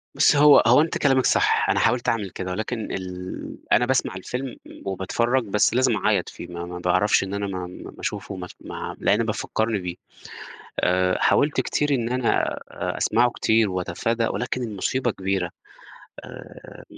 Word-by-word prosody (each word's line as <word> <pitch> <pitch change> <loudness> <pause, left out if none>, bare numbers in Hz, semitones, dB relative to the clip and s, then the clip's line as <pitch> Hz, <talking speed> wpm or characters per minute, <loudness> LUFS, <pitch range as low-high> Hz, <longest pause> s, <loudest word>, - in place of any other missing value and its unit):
بُصي - - +4
هو 145 0 +7
هو 125 +5 +7
أنتِ 160 - -1
كلامِك 135 -3 +3
صح، - - +3
أنا - - +2
حاولت 120 +1 +2
أعمل 105 -4 -1
كده، 90 +1 -5
ولكن 110 +4 -4
ال 90 -1 -6
أنا 125 - +5
باسمع 130 -6 0
الفيلم 125 +7 -5
م - - -13
وباتفرج 115 +7 0
بس 105 0 +2
لازم 125 -2 +3
أعيّط 95 - +1
فيه، - - -9
ما 85 0 -6
ما 90 0 -7
باعرفش 90 +4 +2
إن 95 0 -5
أنا 100 0 -2
ما 95 -1 -4
ما 90 - -10
ما - - -18
اشوفه 100 - -4
ما 90 -1 -6
أس - - -11
ما - - -6
لأن 105 +3 +2
بيفَكّرني 110 0 -1
بيه. 90 -1 -5 0.8
آآ، 90 0 +2
حاولت 145 +1 +3
كتير 145 0 -1
إن 120 -2 -2
أنا 125 -1 0 0.6
أ - - -7
أسمعه 120 +2 +3
كتير 110 -2 +2
وأتفادى 95 +6 -1
ولكن 125 +2 -2
المصيبة 120 +3 -1
كبيرة، 95 -3 -2 0.7
آآ، - - -12
105 Hz, 175 wpm, -24 LUFS, 95-125 Hz, 0.8 s, هو